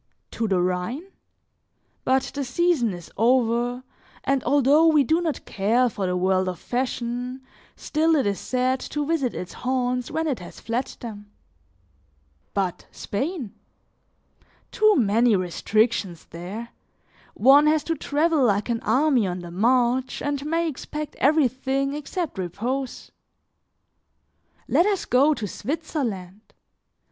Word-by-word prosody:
To 225 - -2
the 190 -3 +2
Rhine? 185 - -2 0.9
But 265 0 +2
the 285 - -2
season 265 -2 +1
is 175 -2 -9
over, 240 +1 +2 0.4
and 275 -1 +1
although 290 +3 +4
we 305 -3 +5
do 320 +6 +2
not 320 -4 -3
care 230 +6 +2
for 200 -4 -3
the 180 0 0
world 185 0 +1
of 180 - -5
fashion, 250 +2 -3 0.3
still 320 +1 +1
it 280 - +2
is 200 -1 -1
sad 255 +1 0
to 295 +2 -3
visit 285 -6 0
its 180 - -6
haunts 250 -1 -1
when 320 0 -1
it 285 -6 -1
has 175 - -11
fled 235 +3 -2
them. 205 -3 -8 1.2
But 190 -3 -2
Spain? 265 - -4 1.2
Too 430 0 +4
many 230 -1 +3
restrictions 190 0 0
there; 190 +8 -7 0.7
one 280 +5 +6
has 305 -1 +3
to 330 - -1
travel 305 +1 +1
like 210 -1 +1
an 230 -1 0
army 265 -6 +2
on 180 0 -4
the 175 -1 -9
march 245 +6 +1
and 285 -1 -2
may 330 +2 +1
expect 300 0 -5
everything 275 -1 +1
except 300 - -4
repose. 240 +9 -4 1.6
Let 350 - +3
us 400 -3 0
go 280 +5 +4
to 210 - -4
Switzerland! 220 - -4
250 Hz, 130 wpm, -24 LUFS, 210-290 Hz, 1.6 s, one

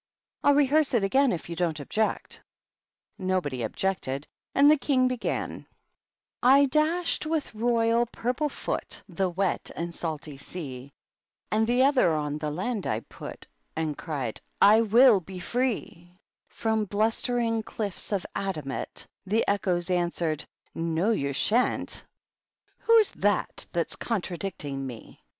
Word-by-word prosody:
I'll 285 - +5
rehearse 290 -1 +3
it 220 - +3
again 265 +7 +3
if 170 - -4
you 170 - -5
don't 165 -3 -1
object." 215 +10 -2 0.8
Nobody 185 -9 -1
objected, 140 - -2 0.3
and 285 +2 +7
the - - +7
King 260 -3 +2
began: 255 -2 -3 0.2
" - - -57 0.2
/ 275 +2 +6
dashed 315 +2 +1
with 315 -5 -1
royal 230 +1 +2
purple 250 +6 -1
foot - - -4
The 185 0 -1
wet 185 +1 -1
and 170 0 -4
salty 155 -4 -5
sea; 140 -3 -7 0.6
And 220 +1 +2
the 245 +2 +4
other 260 - +4
on 150 0 -2
the 150 -1 -2
land 195 +7 -2
I 110 +1 -1
putj - - -9 0.3
And 155 -2 -1
cried 140 -10 -4
J - - -11
^ - - -39 0.2
I 215 +3 +7
will 230 0 +6
be 185 +1 -10
free 245 +6 0
P 175 +2 -19 0.3
From 220 -1 0
blustering 225 +2 +1
cliffs 210 -3 -5
of 195 -3 0
adamant 155 -9 -3 0.2
The 220 +4 +1
echoes 185 -3 0
answered^ 175 -3 0
^ - - -4 0.3
No, 165 +5 0
you 140 -10 0
sharCt 220 - +1 0.9
P - - +3
^Whd^s 450 -3 +6
THAT, 205 -1 0
thafs 170 -1 -2
contradicting 175 - -3
me?' 120 -3 -10
195 Hz, 145 wpm, -27 LUFS, 165-240 Hz, 0.9 s, and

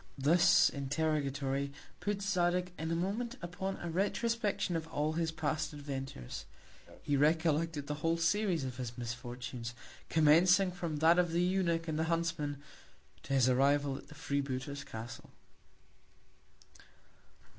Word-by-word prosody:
This 165 +6 +5
Interrogatory 140 -1 -1 0.3
put 205 -1 -2
Zadig 180 -2 +1
in 160 +1 -2
a 165 - 0
Moment 220 +9 -2
upon 190 +3 -4
a 175 - -6
Retrospection 205 0 0
of 160 -1 -2
all 155 -1 -1
his 165 0 0
past 155 0 -2
Adventures. 135 - -6 0.6
He 145 - +1
recollected 155 0 +2
the 150 - -3
whole 165 +1 +2
Series 170 -1 +1
of 130 -2 -5
his 120 -2 -5
Misfortunes; 120 0 -5 0.3
commencing 175 +5 +5
from 170 -3 -4
that 165 +3 +5
of 175 -2 +1
the 175 +1 +2
Eunuch 175 -3 +1
and 155 -1 -1
the 160 - +1
Huntsman, 165 -3 -1 0.6
to 135 - -4
his 130 -2 +4
Arrival 140 +2 +3
at - - -9
the 150 - -13
Free 140 -1 -1
booter's 140 +1 -4
Castle. 115 0 -8
160 Hz, 135 wpm, -33 LUFS, 140-175 Hz, 0.6 s, This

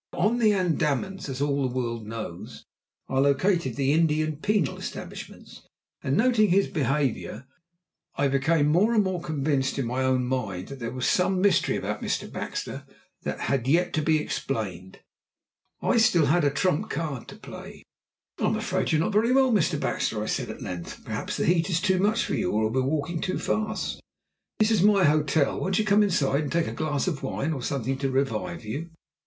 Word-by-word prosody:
Now, - - -6
on 225 +6 +2
the 220 -2 +5
Andamans, 180 -2 0
as 135 0 -4
all 140 -1 0
the 130 -2 -1
world 115 -3 -3
knows, 110 -6 -7 0.4
are 135 0 +1
located 140 - +2
the 135 +2 +1
Indian 155 -1 +1
penal 200 -3 0
establishments, - - -8 0.4
and 135 - 0
noting 225 -3 +4
his 195 +3 +4
behaviour, 140 - -1 0.7
I 140 - +2
became 145 +3 +2
more 185 +10 +3
and 215 - +5
more 185 -2 -2
convinced 140 -4 -1
in 135 - -1
my 125 +3 -1
own 130 -1 +2
mind 110 -8 -3
that 140 -1 -8
there 115 -1 -3
was 130 0 -2
some 185 +1 +2
mystery 195 -2 +3
about - - -3
Mr. - - -2
Baxter - - -5 0.4
that - - -4
had 130 -2 0
yet 170 +6 +2
to 155 - +1
be 155 +1 +3
explained. 105 -11 -4 0.8
I - - +2
had 230 - +4
still 170 -8 +4
a 155 -5 +3
trump 150 +2 0
card 145 -5 -4
to - - -10
play. - - -10 0.6
"I'm - - +1
afraid - - -1
you 160 - +3
are - - +2
not 215 - -2
very 220 +4 +3
well, 265 -1 +4
Mr. 175 -7 +2
Baxter," 105 -6 -1
I - - -3
said - - -2
at - - -7
length. 90 -1 -6
"Perhaps - - -4
the - - 0
heat 170 +1 +2
is 175 -2 +1
too 190 0 +2
much 215 +4 +2
for - - -3
you, - - 0
or 110 +1 +1
we 130 - +1
are - - +1
walking 155 +4 -1
too 185 -1 -1
fast? 220 0 -2 0.6
This 215 +1 +3
is 215 -5 +3
my 200 -1 +5
hotel. 150 -1 +2
Won't 190 0 0
you 215 - +1
come 210 0 +4
inside 150 -8 +2
and 150 - -4
take 170 -1 +1
a - - -4
glass 150 +5 -1
of 150 -7 -2
wine 155 +4 -2
or 135 - -4
something 135 0 -2
to 135 -1 0
revive 130 -4 -2
you?" 145 +11 -5
150 Hz, 200 wpm, -26 LUFS, 130-185 Hz, 0.8 s, the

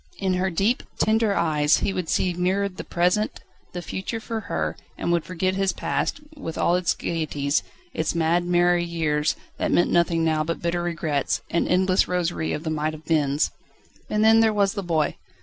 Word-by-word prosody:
In 190 -2 0
her 185 +1 +1
deep, 200 +8 +1 0.2
tender 220 -1 +2
eyes 150 -2 +3
he 195 - -1
would 180 -4 -3
see 180 - +1
mirrored 185 +2 0
the - - -5
present, 180 +5 0 0.3
the 175 -1 -5
future 190 +6 -4
for 225 0 -4
her, 215 - -2 0.2
and - - -1
would 170 -2 +2
forget 185 +1 -1
his 195 -1 +1
past, 170 - -2
with 165 - -6
all 175 - +3
its 180 -1 +1
gaieties, 150 -3 -1 0.3
its 160 +1 -1
mad, 170 +1 +2
merry 175 0 +3
years, 160 -3 0 0.2
that - - 0
meant 175 - +3
nothing 170 -1 +2
now 155 -1 +2
but 165 +2 -3
bitter 170 0 -1
regrets, 160 -8 -1
and 170 - +1
endless 185 +1 +3
rosary 175 -3 -1
of 150 - -3
the 160 - -2
might 155 0 -1
have 155 0 -11
beens. 150 -2 +1 0.6
And 210 0 +1
then 225 0 +7
there 225 -1 +4
was 200 -2 +2
the 200 - -3
boy. 165 -5 0
175 Hz, 190 wpm, -24 LUFS, 160-190 Hz, 0.6 s, then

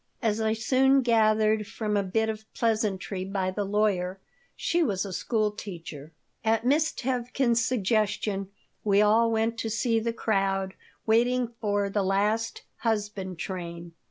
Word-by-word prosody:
As 220 -2 0
I 220 0 +2
soon 265 +4 +3
gathered 215 -2 +3
from 215 -2 -2
a 200 - +3
bit 220 +4 0
of 220 0 -6
pleasantry 210 -4 -1
by 190 -1 -2
the 205 +2 -2
lawyer, 195 -2 0 0.4
she 345 - 0
was 200 - 0
a 195 - -6
school 215 +1 0
teacher 165 -7 -8 0.3
At 225 0 +1
Miss 305 +5 +3
Tevkin's 245 -2 0
suggestion 210 -3 0 0.3
we 200 -1 +3
all 225 +2 +4
went 225 +1 0
to 225 - -2
see 225 +1 +1
the 230 +1 -1
crowd 195 -4 0 0.3
waiting 240 +2 +2
for 205 -2 +1
the 200 +1 0
last 210 +4 0
"husband 205 -5 -2
train." 170 -2 -6
215 Hz, 145 wpm, -27 LUFS, 195-230 Hz, 0.4 s, all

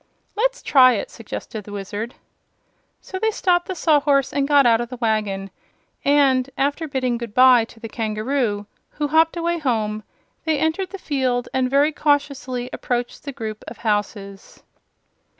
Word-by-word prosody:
"Let's - - 0
try 255 -2 +6
it," 210 - -3
suggested 220 -1 -7
the 205 - -11
Wizard. 205 +4 -5 0.9
So 375 - -6
they 445 - +2
stopped 355 -4 +1
the 375 - -4
Sawhorse 290 -4 +2
and 280 -1 +1
got 285 -2 +5
out 230 -1 +4
of 240 - -5
the 250 - -7
wagon, 210 -4 -1 0.5
and, 275 -2 +3
after 290 +4 0
bidding 255 -4 -1
good 235 -3 -7
bye 255 -2 +7
to 225 - -17
the 225 - -6
kangaroo, 220 0 -2 0.2
who 295 -1 -3
hopped 320 +2 +3
away 340 0 -1
home, 215 -7 -1 0.4
they 315 -2 +1
entered 320 +6 0
the 395 - -7
field 260 -7 -1
and 260 -1 +1
very 285 +3 +3
cautiously 280 -4 0
approached 245 +2 -3
the 280 - -4
group 220 -5 -6
of 230 - -8
houses. 205 -2 -3
255 Hz, 160 wpm, -22 LUFS, 225-290 Hz, 0.9 s, bye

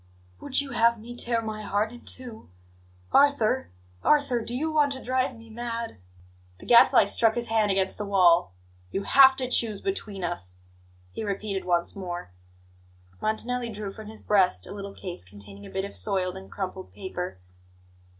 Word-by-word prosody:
"Would 280 0 +4
you 280 -1 -6
have 235 -1 +3
me 240 +3 -9
tear 235 -1 0
my 215 -1 -5
heart 210 +1 -1
in 240 0 -12
two? 240 - -7 0.6
Arthur! 265 -3 +3 0.3
Arthur! 280 -5 +3
Do 235 +2 -4
you 315 +5 -1
want 295 -2 +3
to 260 - -8
drive 255 0 0
me 225 0 -14
mad?" 230 - -5 0.6
The - - -13
Gadfly 235 -3 +7
struck 220 +2 +2
his 235 -1 -2
hand 220 -2 +2
against 190 0 +1
the 210 - -3
wall. 180 - +4 0.3
"You 195 - -3
have 265 +2 +7
to 260 -1 0
choose 230 -4 +3
between 210 - -3
us," 95 - -3 0.6
he - - -5
repeated 200 -1 -3
once 175 -1 0
more. 175 - -6 0.9
Montanelli 240 +2 -1
drew 210 -2 -5
from 215 0 -10
his 220 0 -8
breast 185 - +2
a - - -10
little 200 -1 -7
case 180 - -7
containing 100 +1 -10
a - - -12
bit 190 +1 -2
of 200 - -7
soiled 190 -3 +1
and 190 0 -11
crumpled 190 -1 -5
paper. 180 - -5
215 Hz, 170 wpm, -26 LUFS, 190-240 Hz, 0.9 s, Gadfly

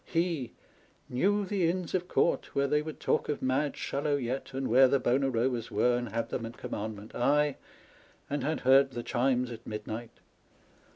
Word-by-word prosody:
He 165 -7 -1 0.3
" - - -35
knew 200 +11 +1
the 185 -4 +1
Inns 180 -1 -3
of 180 -1 0
Court, - - +1
where 140 - +3
they 150 +2 +2
would 155 0 -7
talk - - 0
of 150 - -2
mad 135 +3 0
Shallow 145 +1 -1
yet, 130 0 -3
and 135 0 -2
where 130 +3 +6
the 140 +2 +2
bona 135 +2 +2
robas 120 -1 0
were, 125 0 +2
and 120 -1 -2
had 115 +3 -2
them 115 - -3
at 115 - -11
commandment: 105 0 -6
aye, 145 +3 +2 0.7
and 145 -2 -2
had 155 +3 -1
heard 135 +1 +5
the 120 - -4
chimes 125 0 +1
at 115 - -9
midnight 110 +2 -6
135 Hz, 185 wpm, -30 LUFS, 120-150 Hz, 0.7 s, where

